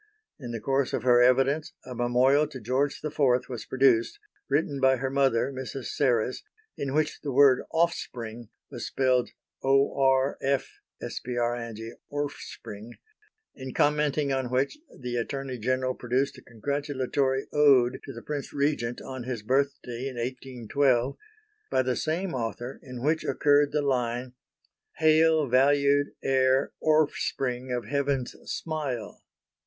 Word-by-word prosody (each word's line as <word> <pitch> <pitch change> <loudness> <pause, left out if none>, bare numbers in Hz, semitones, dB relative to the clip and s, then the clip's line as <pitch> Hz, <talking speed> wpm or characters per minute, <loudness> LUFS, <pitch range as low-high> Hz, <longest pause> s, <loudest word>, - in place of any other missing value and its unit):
In 125 -4 -7
the 115 -1 -4
course 135 +2 0
of - - -1
her 125 -1 +5
evidence 135 +5 +3
a 125 - -7
Memorial 125 +5 +3
to 140 -3 -9
George 130 +5 0
IV 155 0 -5 0.3
was 120 -4 -7
produced, 130 - +3 0.3
written 140 0 0
by 130 0 +4
her 130 +1 -3
mother, 135 -1 +2
Mrs. 130 -1 -6
Serres, 125 -3 +1 0.3
in 140 0 -3
which 155 0 0
the 145 - -3
word 135 -1 +6
offspring 120 -9 -2 0.2
was - - -5
spelled 130 -2 +1 0.3
"orfspring"; 135 0 +2 3.0
in 130 -1 -8
commenting 150 -1 +2
on 130 -2 -1
which 130 - 0 0.2
the 125 -1 -3
Attorney 130 +1 -4
General 130 +2 0
produced 130 +3 -1
a - - -16
congratulatory 135 +2 -1
Ode 135 -4 +4
to - - -7
the 115 - -10
Prince 145 -2 -4
Regent 140 -5 -1
on 130 -2 -7
his 125 -4 -4
birthday 135 0 -1
in 130 - -6
1812, 125 +1 0 0.5
by 130 - +2
the 125 -1 0
same 170 +7 -2
author, 120 +1 -4
in 125 -2 -8
which 155 +2 +1
occurred 145 0 +3
the 150 0 0
line: 125 -2 -1 0.6
"Hail 160 0 +4
valued 140 +2 +3
heir 130 0 +2
orfspring 135 -4 0
of 120 -3 -2
Heaven's 140 0 -1 0.2
smile." 140 -9 -4
135 Hz, 125 wpm, -27 LUFS, 125-145 Hz, 3.0 s, word